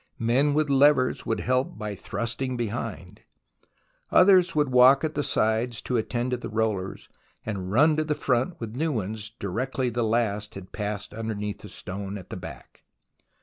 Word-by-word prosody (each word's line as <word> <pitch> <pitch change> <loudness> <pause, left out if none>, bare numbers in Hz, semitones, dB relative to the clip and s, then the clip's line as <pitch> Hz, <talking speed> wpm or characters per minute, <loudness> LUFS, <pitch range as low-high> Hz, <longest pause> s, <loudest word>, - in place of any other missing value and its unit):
Men 130 +6 +2
with 155 0 +2
levers 140 -1 +3
would 115 - 0
help 130 +1 0
by 105 -1 -4
thrusting 115 +5 -3
behind; 105 -5 -5 0.9
others 185 -2 +5
would 150 -3 +2
walk 130 +3 +6
at 155 -1 -1
the 145 - -1
sides 110 -2 0
to 125 - -2
attend 120 +2 -1
to 125 - 0
the 120 - -7
rollers, 110 -4 -2 0.4
and 95 -4 -4
run 150 +8 +5
to 155 - +2
the 150 -1 -1
front 130 +7 0
with 115 -3 -6
new 160 +4 0
ones 110 -2 -3
directly 120 +4 -2
the 120 +1 -1
last 110 -2 0
had 95 -1 -9
passed 105 -1 -4
underneath 105 -2 -4
the - - -11
stone 100 +2 -6
at 95 - -12
the - - -4
back. - - -11
115 Hz, 170 wpm, -26 LUFS, 105-130 Hz, 0.9 s, walk